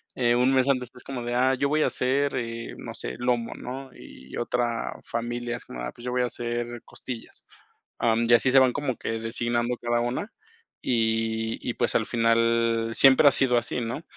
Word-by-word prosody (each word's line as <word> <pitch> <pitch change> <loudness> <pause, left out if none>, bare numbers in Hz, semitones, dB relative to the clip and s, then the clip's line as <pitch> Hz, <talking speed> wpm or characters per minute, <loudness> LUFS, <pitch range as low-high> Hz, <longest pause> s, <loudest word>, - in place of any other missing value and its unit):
eh, 120 -2 +2
un 125 +2 +3
mes 130 0 +3
antes 130 -3 +1
es 125 - -12
como 130 -3 -5
de: 120 0 -3
"Ah, 130 +2 +3
yo 140 +2 0
voy 155 +1 +2
a - - +3
hacer, 140 +2 0
eh, 115 -2 -4
no - - -8
sé, - - -5
lomo", 120 -1 0
¿no?, 130 +1 -7
y 65 +1 -12
otra 120 -1 -1
familia, 120 +1 -3
es - - -12
como: - - -8
"Ah, - - -4
pues, 120 - -14
yo 125 - -3
voy 125 0 +1
a - - +2
hacer 120 0 -4
costillas". 120 -3 -9 0.5
Ah, 115 -1 +3
mm, 115 +1 +1
y - - +6
así 120 +2 +5
se 135 - +5
van 130 -2 +5
como 140 -4 -2
que 115 0 -3
designando 120 +1 -1
cada 120 0 0
una, 125 - -3 0.5
y 110 -1 0
y, - - -3
pues, - - +1
al - - +1
final 115 0 +2
siempre 135 +2 +7
ha - - +8
sido 125 -2 +4
así, 120 +1 -3
¿no?, 120 +6 -4
120 Hz, 210 wpm, -26 LUFS, 115-125 Hz, 0.5 s, ha